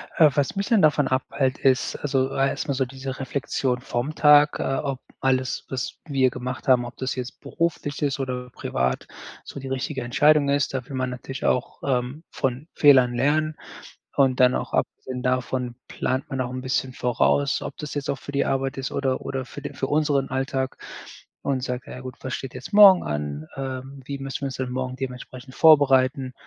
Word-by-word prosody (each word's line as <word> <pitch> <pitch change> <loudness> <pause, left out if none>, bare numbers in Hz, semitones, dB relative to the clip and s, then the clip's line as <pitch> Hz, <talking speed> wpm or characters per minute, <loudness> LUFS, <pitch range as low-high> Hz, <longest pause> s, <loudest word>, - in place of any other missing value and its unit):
Äh, 155 -2 +7
was 145 +3 0
mich 200 0 -1
dann 230 -4 +4
davon 145 -2 +4
abhält, 130 0 0
ist 130 -1 +2
also 135 -2 0
erstmal 135 +1 0
so 130 0 +1
diese 135 +1 -7
Reflexion 130 -2 -1
vom 125 +7 -3
Tag, 150 -1 +6
äh, - - 0
ob 135 -2 -3 0.2
alles, 130 -1 0
was 130 -2 -4
wir 135 -4 +2
gemacht 125 +1 -6
haben, 125 -2 +4
ob 120 - -9
das 130 0 -2
jetzt 125 -1 -6
beruflich 160 -3 -2
ist 145 -2 0
oder 125 -1 -3
privat, 65 - -2 0.4
so 140 - -8
die 135 - -7
richtige 135 +1 -3
Entscheidung 145 +4 +4
ist. 140 -1 +1
Da 130 -1 -3
will 135 - -6
man 130 -1 -1
natürlich 125 +1 -6
auch, 125 - 0
ähm, 130 +3 -1
von 130 +4 -2
Fehlern 130 -4 +6
lernen. 150 +5 +1 0.6
Und 130 -2 +3
dann 125 0 +5
auch - - -4
abgesehen 125 -1 -2
davon 125 -1 -1
plant 130 +1 -2
man 135 -2 -2
auch 125 -1 -3
'n 130 0 -4
bisschen 130 0 -1
voraus, 125 +4 +1
ob - - -6
das 150 -1 -6
jetzt 145 -1 -3
auch 140 - 0
für 145 - -9
die 140 - +1
Arbeit 135 0 -1
ist 135 -1 -3
oder 130 -2 -1
oder 135 -1 -4
für 145 - -9
den 145 - -7
für - - -2
unseren 145 -2 +1
Alltag 130 0 -2 0.7
und 135 -2 0
sagt: 125 0 -3
„Ja 125 - -8
gut, 130 -1 -8
was 130 - -4
steht 135 - -5
jetzt 130 +10 -8
morgen 200 -3 +9
an? 75 0 -4
Ähm, 135 0 -6
wie 140 0 -4
müssen 135 +1 -5
wir - - -2
uns 130 - -5
dann 130 -1 -3
morgen 130 0 -3
dementsprechend 130 0 -7
vorbereiten?“ 135 -4 +5
130 Hz, 195 wpm, -24 LUFS, 130-140 Hz, 0.7 s, morgen